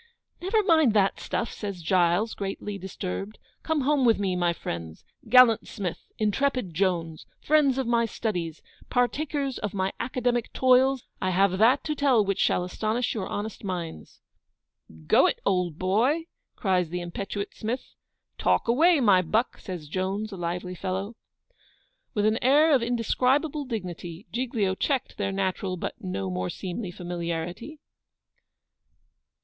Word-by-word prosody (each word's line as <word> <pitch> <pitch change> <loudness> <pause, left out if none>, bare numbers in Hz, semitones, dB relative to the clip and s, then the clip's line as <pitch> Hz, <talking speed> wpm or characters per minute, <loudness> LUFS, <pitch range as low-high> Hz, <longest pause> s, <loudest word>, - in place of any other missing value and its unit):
'Never 420 +4 +2
mind 315 - +4
that 195 -2 +3
stuff,' 235 - -3
says 200 -5 -6
GILES, 180 +5 +2
greatly 200 +1 -5
disturbed. 190 +2 -5 0.2
'Come 320 -2 0
home 280 0 +2
with 230 -3 +5
me, 195 -2 -1
my 175 -1 +2
friends. 85 - -6 0.2
Gallant 250 -2 +6
Smith! 190 -6 -6
intrepid 220 -2 0
Jones! 165 -3 -1
friends 290 -3 +3
of 265 - 0
my 235 0 +2
studies 175 -8 -3 0.3
partakers 275 +2 0
of 210 -1 -4
my 190 0 -1
academic 245 -1 -1
toils 260 0 +4 0.2
I 185 - +1
have 190 +1 +2
that 245 +6 +5
to 305 - -1
tell 270 -7 +3
which 195 -1 -1
shall 180 - +2
astonish 215 +6 -1
your 210 -4 -3
honest 210 +2 -5
minds.' 175 - -6 0.8
'Go - - +5
it, - - -1
old 180 -5 +1
boy!' 230 - +2 0.3
cries 180 -4 +1
the 180 +2 -3
impetuous 195 +3 -4
Smith. 235 +4 -5 0.5
'Talk - - +2
away, 315 +8 +5
my 200 -7 +5
buck!' 215 +8 0
says 175 -5 -7
Jones, 195 +6 -2
a - - -6
lively 180 +1 -3
fellow. 190 +4 -4 1.0
With 210 -1 +2
an 215 +1 +2
air 295 +5 +5
of 265 - +4
indescribable 260 +5 +1
dignity, 180 -5 -6
Giglio 235 -6 0
checked 265 +6 -1
their 195 -1 0
natural, 190 -1 -2
but - - -4
no 95 - -3
more 90 0 -2
seemly, 185 - -5
familiarity. 175 - -5
205 Hz, 145 wpm, -26 LUFS, 180-250 Hz, 1.0 s, Gallant